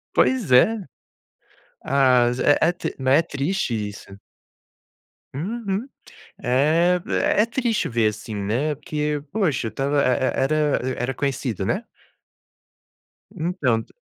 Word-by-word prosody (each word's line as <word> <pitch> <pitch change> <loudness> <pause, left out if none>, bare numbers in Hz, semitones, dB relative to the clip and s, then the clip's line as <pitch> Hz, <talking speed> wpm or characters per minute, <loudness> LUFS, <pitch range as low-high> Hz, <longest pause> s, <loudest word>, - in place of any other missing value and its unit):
Pois 245 - +2
é. 215 - +5 1.1
Ah, 130 -3 +3
z 125 - -3
é 145 - +4
é - - +2
tri 175 - -5
não, 130 -1 0
é 145 +5 +6
triste 150 -1 -2
isso. 105 -2 -6 1.2
Uhum, 210 - -3 0.5
é 160 +8 +3
v 190 - -4
é 210 - +3
triste 235 -1 -1
ver, 115 -3 +1
assim, 110 +1 -7
né, 115 +10 -1
porque 150 0 -3
poxa, 155 - 0
estava 140 +4 0
e - - +2
e 130 +1 +1
era 150 0 +1 0.2
era 125 +2 -2
conhecido, 130 -4 -2
né? - - -1 1.5
Entanto. 145 -10 -1
140 Hz, 125 wpm, -23 LUFS, 125-175 Hz, 1.5 s, é